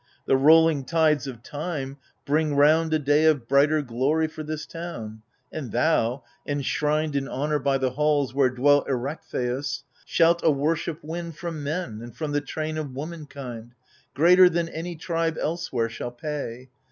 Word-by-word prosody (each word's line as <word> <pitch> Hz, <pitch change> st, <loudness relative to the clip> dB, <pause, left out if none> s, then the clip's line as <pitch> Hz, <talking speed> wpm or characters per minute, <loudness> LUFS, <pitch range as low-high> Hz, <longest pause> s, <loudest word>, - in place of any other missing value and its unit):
The -, -, +3 dB
rolling 155 Hz, +1 st, +5 dB
tides 155 Hz, -3 st, +2 dB
of 120 Hz, -3 st, -8 dB
time 145 Hz, -3 st, -5 dB, 0.3 s
bring 150 Hz, 0 st, +1 dB
round 155 Hz, +3 st, +4 dB
A 155 Hz, -, +3 dB
day 150 Hz, +1 st, +2 dB
of 145 Hz, -7 st, +3 dB
brighter 145 Hz, +3 st, +3 dB
glory 140 Hz, +6 st, 0 dB
for 155 Hz, 0 st, -8 dB
this 155 Hz, 0 st, -5 dB
town; 115 Hz, -11 st, -7 dB, 0.3 s
And 140 Hz, -8 st, -6 dB
thou, 125 Hz, -2 st, +1 dB, 0.2 s
enshrined 150 Hz, +2 st, 0 dB
in 135 Hz, -1 st, -1 dB
honour 150 Hz, +3 st, -1 dB
by 135 Hz, 0 st, +1 dB
the 130 Hz, -1 st, 0 dB
halls 145 Hz, -2 st, +1 dB
Where 135 Hz, -1 st, +3 dB
dwelt 140 Hz, +3 st, +3 dB
Erechtheus, 135 Hz, 0 st, -3 dB, 0.2 s
shalt 170 Hz, 0 st, +3 dB
a -, -, +5 dB
worship 155 Hz, +2 st, -1 dB
win 170 Hz, +2 st, -5 dB
From 160 Hz, -1 st, -6 dB
men 145 Hz, -8 st, -3 dB
and 120 Hz, 0 st, -10 dB
from 155 Hz, -2 st, -3 dB
the 145 Hz, 0 st, 0 dB
train 155 Hz, +2 st, -4 dB
of 140 Hz, -4 st, -6 dB
womankind. 140 Hz, -6 st, -7 dB, 0.4 s
Greater 180 Hz, +5 st, +7 dB
than 170 Hz, -1 st, -1 dB
any 170 Hz, +2 st, -5 dB
tribe 165 Hz, 0 st, -2 dB
elsewhere 150 Hz, -8 st, -1 dB
shall 115 Hz, +1 st, -5 dB
pay. 130 Hz, -1 st, -6 dB
145 Hz, 160 wpm, -25 LUFS, 135-160 Hz, 0.4 s, Greater